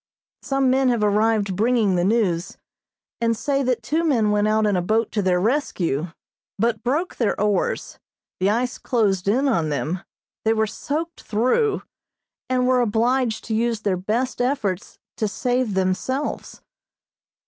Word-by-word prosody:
Some 270 Hz, -2 st, +1 dB
men 265 Hz, 0 st, +3 dB
have 235 Hz, -3 st, +1 dB
arrived 210 Hz, -1 st, +2 dB
bringing 220 Hz, -1 st, +2 dB
the 175 Hz, -, +1 dB
news, 190 Hz, -4 st, 0 dB, 0.6 s
and 230 Hz, -1 st, +1 dB
say 275 Hz, +2 st, 0 dB
that 250 Hz, -3 st, 0 dB
two 310 Hz, +8 st, 0 dB
men 235 Hz, -10 st, +2 dB
went 210 Hz, 0 st, +2 dB
out 215 Hz, 0 st, +2 dB
in 205 Hz, -2 st, +2 dB
a 180 Hz, -, +1 dB
boat 220 Hz, +5 st, 0 dB
to 210 Hz, -, 0 dB
their 185 Hz, -2 st, +2 dB
rescue, 180 Hz, -, 0 dB, 0.5 s
but 225 Hz, 0 st, 0 dB
broke 295 Hz, +9 st, -1 dB
their 230 Hz, -, 0 dB
oars, 205 Hz, -2 st, -1 dB, 0.4 s
the 190 Hz, +2 st, +2 dB
ice 245 Hz, +4 st, -1 dB
closed 200 Hz, -7 st, 0 dB
in 255 Hz, +8 st, +2 dB
on 170 Hz, -, +1 dB
them, 150 Hz, +5 st, -2 dB, 0.4 s
they 225 Hz, -, +3 dB
were 220 Hz, 0 st, +2 dB
soaked 310 Hz, +9 st, -4 dB
through, 255 Hz, -, +1 dB, 0.7 s
and 255 Hz, -1 st, +2 dB
were 255 Hz, 0 st, +3 dB
obliged 235 Hz, +1 st, +1 dB
to 225 Hz, -, -4 dB
use 230 Hz, 0 st, 0 dB
their 200 Hz, -3 st, +1 dB
best 225 Hz, +8 st, -2 dB
efforts 230 Hz, -8 st, -2 dB, 0.2 s
to 215 Hz, -, 0 dB
save 245 Hz, 0 st, -1 dB
themselves. 190 Hz, +10 st, -2 dB
225 Hz, 155 wpm, -22 LUFS, 200-255 Hz, 0.7 s, men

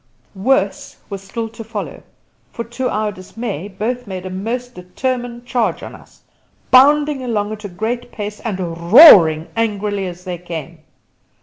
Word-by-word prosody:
Worse 200 Hz, 0 st, 0 dB
was 195 Hz, -1 st, -5 dB
still 225 Hz, +4 st, -5 dB
to 230 Hz, +1 st, -10 dB
follow, 225 Hz, -, -6 dB, 0.5 s
for 235 Hz, -, -5 dB
to 240 Hz, +3 st, -3 dB
our 215 Hz, 0 st, -1 dB
dismay 200 Hz, -1 st, -6 dB
both 225 Hz, +5 st, -4 dB
made 190 Hz, -1 st, -6 dB
a 185 Hz, -, -5 dB
most 240 Hz, +6 st, -4 dB
determined 240 Hz, +6 st, -4 dB
charge 245 Hz, -2 st, -1 dB
on -, -, -8 dB
us, -, -, -17 dB, 0.5 s
bounding 290 Hz, +1 st, +5 dB
along 215 Hz, -4 st, -2 dB
at 215 Hz, -1 st, -7 dB
a -, -, -5 dB
great 230 Hz, +7 st, -4 dB
pace 210 Hz, 0 st, -6 dB
and 210 Hz, -5 st, -4 dB, 0.3 s
roaring 175 Hz, -, +9 dB
angrily 205 Hz, -3 st, -1 dB
as 180 Hz, 0 st, -9 dB
they 180 Hz, -2 st, -5 dB
came. 170 Hz, -2 st, -7 dB
215 Hz, 150 wpm, -18 LUFS, 190-245 Hz, 0.5 s, roaring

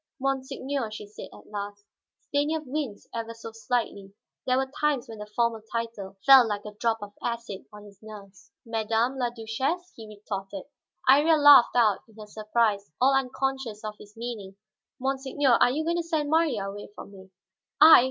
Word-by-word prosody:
"Monseigneur," 265 Hz, -1 st, -2 dB
she 215 Hz, -1 st, -8 dB
said 205 Hz, +1 st, -10 dB
at -, -, -16 dB
last. 205 Hz, 0 st, -6 dB, 0.4 s
Stanief 300 Hz, +2 st, -1 dB
winced 265 Hz, -6 st, -4 dB
ever 230 Hz, 0 st, -5 dB
so 225 Hz, 0 st, -9 dB
slightly; 220 Hz, -3 st, -3 dB, 0.3 s
there 255 Hz, 0 st, +3 dB
were 265 Hz, 0 st, -1 dB
times 295 Hz, -5 st, +1 dB
when 225 Hz, -2 st, -9 dB
the 210 Hz, -, -7 dB
formal 230 Hz, +1 st, 0 dB
title 225 Hz, -4 st, -5 dB
fell 265 Hz, -3 st, +9 dB
like 205 Hz, -1 st, -3 dB
a 210 Hz, -, -7 dB
drop 225 Hz, +2 st, 0 dB
of 205 Hz, 0 st, -9 dB
acid 235 Hz, -4 st, -4 dB
on 210 Hz, 0 st, -12 dB
his 200 Hz, -2 st, -16 dB
nerves. 205 Hz, -1 st, -13 dB
"Madame 225 Hz, +3 st, 0 dB
la 245 Hz, -1 st, +1 dB
Duchesse?" 260 Hz, +10 st, -3 dB
he 225 Hz, -1 st, -10 dB
retorted. 200 Hz, -2 st, -6 dB, 0.4 s
Iría 295 Hz, +5 st, +6 dB
laughed 290 Hz, -5 st, +7 dB
out 220 Hz, -5 st, +4 dB
in 220 Hz, -, -21 dB
her 215 Hz, -, -8 dB
surprise, 215 Hz, -1 st, 0 dB
all 265 Hz, +2 st, +4 dB
unconscious 265 Hz, -4 st, -2 dB
of 215 Hz, -1 st, -4 dB
his 210 Hz, +1 st, -15 dB
meaning. 225 Hz, -5 st, -6 dB, 0.4 s
"Monseigneur, 265 Hz, 0 st, +1 dB
are -, -, +6 dB
you 295 Hz, +5 st, -1 dB
going 340 Hz, +2 st, 0 dB
to -, -, +1 dB
send 315 Hz, -3 st, -2 dB
Marya 300 Hz, -12 st, +2 dB
away 205 Hz, +1 st, -8 dB
from 200 Hz, -, -10 dB
me?" 190 Hz, -1 st, -14 dB, 0.5 s
"I! 315 Hz, +2 st, +10 dB
230 Hz, 175 wpm, -27 LUFS, 210-270 Hz, 0.5 s, I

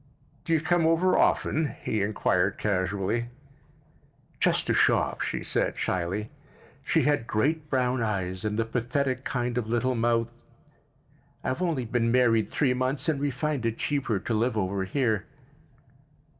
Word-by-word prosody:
"Do 165 Hz, -, 0 dB
you 160 Hz, -, +3 dB
come 175 Hz, 0 st, +2 dB
over 170 Hz, +3 st, +3 dB
often?" 155 Hz, -1 st, +1 dB
he 110 Hz, -, -1 dB
inquired 100 Hz, -2 st, +1 dB
casually. 100 Hz, +3 st, -1 dB, 1.1 s
"Just -, -, +2 dB
to -, -, +1 dB
shop," -, -, +2 dB
she -, -, -2 dB
said -, -, -1 dB
shyly. 95 Hz, +4 st, -2 dB, 0.5 s
She -, -, +2 dB
had 145 Hz, -5 st, +1 dB
great 150 Hz, +7 st, 0 dB
brown 125 Hz, -2 st, +1 dB
eyes 95 Hz, -4 st, -2 dB
and 105 Hz, 0 st, -1 dB
the 115 Hz, -, +1 dB
pathetic 130 Hz, +3 st, -1 dB
kind 125 Hz, 0 st, -1 dB
of 110 Hz, -, -4 dB
little 120 Hz, +2 st, +1 dB
mouth. 115 Hz, 0 st, +1 dB, 1.1 s
"I've 130 Hz, +7 st, -2 dB
only 160 Hz, -9 st, 0 dB
been 115 Hz, 0 st, 0 dB
married 115 Hz, -3 st, +3 dB
three 135 Hz, -4 st, +1 dB
months, 130 Hz, +4 st, -1 dB
and 150 Hz, -3 st, 0 dB
we 145 Hz, +1 st, 0 dB
find 140 Hz, 0 st, -2 dB
it 115 Hz, 0 st, -1 dB
cheaper 135 Hz, -7 st, -1 dB
to 105 Hz, +4 st, -3 dB
live 110 Hz, +1 st, +1 dB
over 95 Hz, -1 st, -1 dB
here." 110 Hz, -2 st, 0 dB
120 Hz, 150 wpm, -27 LUFS, 105-140 Hz, 1.1 s, you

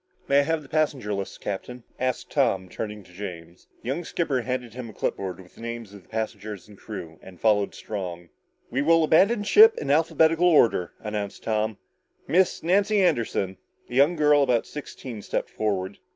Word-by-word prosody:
"May 140 Hz, +1 st, +5 dB
I -, -, +6 dB
have 160 Hz, +2 st, -1 dB
the -, -, -14 dB
passenger 140 Hz, -8 st, 0 dB
lists, 100 Hz, -1 st, -4 dB
Captain?" 120 Hz, +5 st, -6 dB, 0.2 s
asked 130 Hz, 0 st, -2 dB
Tom, 95 Hz, -1 st, +1 dB
turning 105 Hz, +1 st, -6 dB
to 90 Hz, -, -19 dB
James. 90 Hz, -3 st, -9 dB, 0.2 s
The 120 Hz, -, -4 dB
young 155 Hz, +6 st, -2 dB
skipper 150 Hz, -6 st, -1 dB
handed 125 Hz, -2 st, -4 dB
him 125 Hz, -1 st, -7 dB
a -, -, -11 dB
clip -, -, -1 dB
board 95 Hz, -1 st, -5 dB
with 90 Hz, -1 st, -15 dB
the -, -, -15 dB
names 115 Hz, -3 st, -6 dB
of 100 Hz, -, -11 dB
the -, -, -28 dB
passengers 110 Hz, -2 st, -5 dB
and 105 Hz, -, -14 dB
crew 85 Hz, -6 st, -8 dB
and 90 Hz, -2 st, -13 dB
followed 105 Hz, -2 st, +2 dB
Strong. 90 Hz, -5 st, -6 dB, 0.4 s
"We 135 Hz, -, 0 dB
will 165 Hz, +2 st, +4 dB
abandon 200 Hz, +8 st, +4 dB
ship 435 Hz, -, +7 dB
in 140 Hz, -, -2 dB
alphabetical 160 Hz, +2 st, +3 dB
order," 120 Hz, -, +4 dB
announced 105 Hz, -2 st, -4 dB
Tom. 110 Hz, -1 st, -1 dB, 0.5 s
"Miss 180 Hz, +4 st, +2 dB
Nancy 200 Hz, +4 st, +3 dB
Anderson?" 115 Hz, -, +1 dB, 0.3 s
A -, -, -7 dB
young 140 Hz, +7 st, +4 dB
girl 150 Hz, -2 st, +4 dB
about 125 Hz, -4 st, +2 dB
sixteen 130 Hz, -6 st, -8 dB
stepped -, -, -3 dB
forward. 100 Hz, -2 st, -2 dB
115 Hz, 185 wpm, -25 LUFS, 100-150 Hz, 0.5 s, ship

